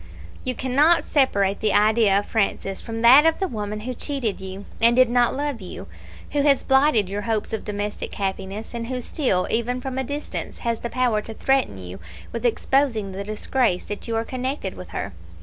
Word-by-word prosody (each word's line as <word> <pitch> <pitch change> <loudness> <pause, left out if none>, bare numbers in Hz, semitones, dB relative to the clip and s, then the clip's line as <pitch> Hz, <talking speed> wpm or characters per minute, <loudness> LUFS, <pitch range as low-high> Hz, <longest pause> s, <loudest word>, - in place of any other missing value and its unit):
You 255 -2 -2
cannot 290 +6 +3
separate 200 -9 +2
the 215 -2 +1
idea 210 -1 +4
of 205 - 0
Francis 195 -3 -1
from 225 -1 -5
that 255 +5 +8
of 325 - +2
the 385 - -1
woman 210 - -4
who 250 +3 -4
cheated 245 -6 -3
you, 190 +1 -7 0.2
and 235 +1 +5
did 255 -1 +5
not 245 +1 +3
love 285 -5 -2
you; 185 - -8 0.5
who 290 - +1
has 280 -2 +3
blighted 265 -6 +3
your 200 +2 -3
hopes 220 0 -2
of 220 - -2
domestic 205 0 -4
happiness; 195 +2 -4
and 230 -1 -4
who 255 0 -3
still, 245 - 0
even 240 +2 0
from 265 0 -4
a - - 0
distance, 285 +3 -5
has 230 -1 0
the 235 - -4
power 245 -4 +1
to 220 +1 -9
threaten 270 - +1
you 90 0 -8 0.3
with 235 +1 0
exposing 235 -4 +1
the 195 +1 -5
disgrace 215 -1 0
that 205 - -6
you 230 - -2
are 225 +1 0
connected 255 -6 -3
with 180 - -10
her. 95 - -5
230 Hz, 200 wpm, -23 LUFS, 205-260 Hz, 0.5 s, that